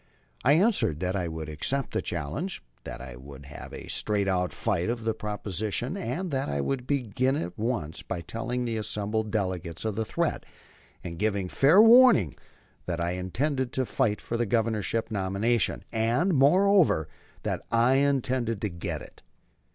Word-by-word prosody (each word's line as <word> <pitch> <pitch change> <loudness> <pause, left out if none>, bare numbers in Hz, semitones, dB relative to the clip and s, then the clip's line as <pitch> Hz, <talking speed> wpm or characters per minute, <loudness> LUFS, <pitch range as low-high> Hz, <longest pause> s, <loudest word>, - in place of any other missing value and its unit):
I 140 - +5
answered 175 - +2
that 90 +1 -1
I 90 -3 -1
would 80 -1 -5
accept 125 - -2
the - - 0
challenge, 90 - -4 0.2
that 65 - -7
we - - -9
would 70 0 -11
have 75 +1 -10
a - - -8
straight 105 -2 0
out 90 -1 +1
fight 100 -4 -1
on 120 -1 -2
the 110 0 0
proposition, 105 - -3
and 185 -2 -3
that 135 -1 -1
I 70 0 -1
would 125 - -2
begin 130 -1 0
it - - -1
at 85 +3 -8
once 105 -9 -2
by 90 -3 -4
telling 120 +6 -3
the 115 -1 -2
assembled 105 0 -2
delegates 95 -4 -2
of 110 - 0
the 110 - 0
threat, - - -1 0.6
and 85 -2 -6
giving 100 -3 0
fair 150 - +5
warning 225 - +7 0.5
that 85 -2 -2
I 85 +1 0
intended 120 - -1
to 130 - 0
fight 105 -2 0
for 115 - -3
the 120 -1 0
Governorship 115 0 0
nomination, 100 +3 0
and, 120 +12 +1
moreover, 165 - +4 0.4
that - - -2
I 120 +3 +4
intended 130 -5 +1
to 105 - -1
get 85 -2 -5
it. - - -15
110 Hz, 170 wpm, -27 LUFS, 90-130 Hz, 0.6 s, warning